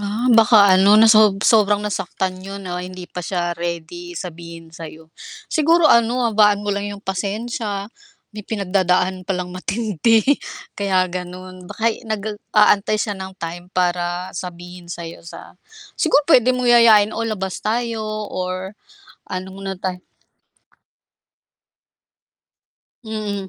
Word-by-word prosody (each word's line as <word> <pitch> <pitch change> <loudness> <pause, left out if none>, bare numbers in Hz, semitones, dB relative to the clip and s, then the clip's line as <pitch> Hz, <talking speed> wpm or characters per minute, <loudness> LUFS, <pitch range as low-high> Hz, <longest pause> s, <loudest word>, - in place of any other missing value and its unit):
Ah, 210 +5 -2
baka 215 -3 +6
ano 195 +2 +5
na 225 +1 +7
sob 210 -2 +5
sobrang 205 -2 +4
nasaktan 190 -2 -3
yun 195 +1 -8
na 180 -1 -4
hindi 180 0 -8
pa - - -7
siya 175 0 -2
ready 175 - -6
sabihin 170 - -9
sa'yo. 160 -1 -11 0.4
Siguro 325 +1 +3
ano, 235 +2 +3
habaan 210 -2 +3
mo 205 - -1
lang 200 +1 -3
yung 205 0 -9
pasensiya, 205 +1 -4 0.4
may 215 - -7
pinagdadaan 185 -2 0
palang 180 -2 -3
matindi, 215 +3 +1 0.5
kaya 190 -2 +1
ganun. 180 0 -8
Baka 225 +1 0 0.2
nag-aantay 210 -1 +1
siya 210 0 -2
ng 190 -1 -8
time 175 +1 -7
para 180 0 -1
sabihin 175 0 -9
sa'yo 170 -1 -8
sa - - -11 0.5
siguro 300 -2 +3
puwede 255 -5 +4
mong 250 -1 0
yayain 220 -3 +6
o - - -4
labas 190 -4 -4
tayo 230 +1 -2 0.3
or 185 +1 -4 0.5
ano 185 +1 -6 0.2
na 195 - -3
tayo 180 -1 -6 3.0
Mm, 210 -3 -4
195 Hz, 125 wpm, -20 LUFS, 180-215 Hz, 3.0 s, na